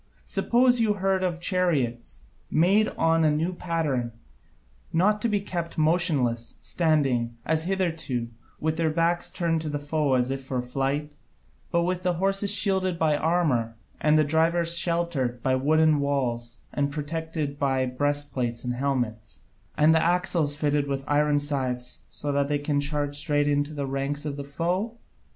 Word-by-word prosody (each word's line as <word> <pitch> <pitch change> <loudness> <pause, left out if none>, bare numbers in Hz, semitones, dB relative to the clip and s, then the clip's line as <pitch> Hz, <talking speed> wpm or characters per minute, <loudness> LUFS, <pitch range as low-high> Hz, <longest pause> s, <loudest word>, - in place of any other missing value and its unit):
Suppose 245 +1 +3
you 220 -2 +3
heard 190 -1 0
of 175 -2 -1
chariots, 150 - -1 0.3
made 195 +7 +3
on 165 0 +3
a 155 - +4
new 160 +4 0
pattern, 150 -9 -2 0.8
not 205 +5 +2
to 235 - +1
be 205 -1 +1
kept 175 -4 -5
motionless, 155 - +1
standing, 135 -8 0
as 160 0 0
hitherto, 165 -10 -1 0.3
with 160 +1 -1
their 165 -1 +1
backs 170 +2 +1
turned 165 -2 -1
to 155 - -4
the 145 - -2
foe 145 -1 0
as 125 +1 +1
if 135 0 -4
for 130 -1 -3
flight, 135 +4 -2 0.6
but 170 0 +1
with 180 +1 -1
the 180 -1 +1
horses 195 +3 0
shielded 190 -3 +2
by 155 -2 +2
armour, 145 -9 +1 0.2
and 155 0 +3
the 155 - +5
drivers 165 +3 +2
sheltered 170 -9 -1
by 130 - +2
wooden 155 +3 +3
walls 125 -5 -2
and 140 0 0
protected 150 -1 -4
by 135 -2 +1
breastplates 130 -2 -2
and 125 -1 -2
helmets, 120 -5 -3 0.4
and 155 +1 +5
the 160 - +4
axles 170 -4 +1
fitted 145 -1 0
with 135 -1 -2
iron 145 0 +2
scythes 130 -4 -3
so 145 - -2
that 140 0 +1
they 145 0 +1
can 145 0 0
charge 145 0 -1
straight 145 0 +1
into 145 +1 +1
the 145 -2 -3
ranks 140 +2 -3
of 145 -2 -3
the 140 - -5
foe? 180 +10 -2
150 Hz, 160 wpm, -26 LUFS, 140-170 Hz, 0.8 s, the